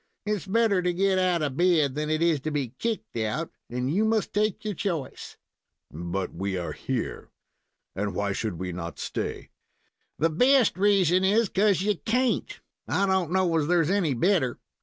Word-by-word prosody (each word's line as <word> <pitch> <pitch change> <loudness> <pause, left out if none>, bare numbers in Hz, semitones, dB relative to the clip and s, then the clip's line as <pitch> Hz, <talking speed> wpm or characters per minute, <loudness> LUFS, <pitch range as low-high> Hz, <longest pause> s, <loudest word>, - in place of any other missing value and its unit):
It's 210 -3 -2
better 210 -2 +2
to 180 0 0
get 190 +1 +2
out 180 -3 +1
of 140 -3 -2
bed 170 -6 +3
than 150 +2 -3
it 155 +1 +1
is 165 -3 +3
to 155 - -3
be 140 -6 -3
kicked 230 -2 -3
out, 115 +9 -2 0.2
and 125 +4 -2
you 205 +5 +2
must 220 -1 0
take 210 0 0
your 210 - -1
choice." 170 -7 -4 0.6
"But 85 +4 -4
we 95 +2 -3
are 85 - -3
here, - - -4 0.7
and 100 0 -2
why 100 +1 -1
should 100 -2 -3
we 90 +1 -4
not 85 -1 -6
stay?" - - -4 0.7
"The 165 +1 +2
best 250 - +4
reason 190 -2 +3
is 210 +2 +3
'cause 195 -2 +2
you 205 -2 +1
can't. 250 +5 -1 0.3
I 200 - +1
don't 190 -4 +1
know 185 -3 +2
as 150 -2 0
there's 170 -1 +2
any 175 -9 +1
better. 145 -3 +1
175 Hz, 180 wpm, -26 LUFS, 130-200 Hz, 0.7 s, best